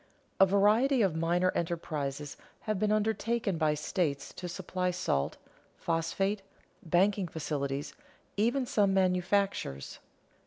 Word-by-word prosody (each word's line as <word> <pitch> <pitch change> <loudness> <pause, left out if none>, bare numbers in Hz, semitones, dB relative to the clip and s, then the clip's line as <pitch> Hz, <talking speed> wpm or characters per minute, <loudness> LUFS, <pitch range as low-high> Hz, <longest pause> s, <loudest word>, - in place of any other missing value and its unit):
A 195 - +7
variety 215 +7 +4
of 185 -5 +1
minor 175 +3 +2
enterprises 150 -4 -3 0.3
have 215 -3 -2
been 210 +1 +1
undertaken 215 -3 0
by 155 -2 +2
states 145 -2 -2
to 180 - -6
supply 180 +1 -2
salt, 175 - -1 0.4
phosphate, 195 +5 -1 0.4
banking 190 +3 +2
facilities, 145 -3 -3 0.4
even 240 +6 +1
some 200 -4 +2
manufactures. 185 - 0
180 Hz, 110 wpm, -30 LUFS, 160-205 Hz, 0.4 s, A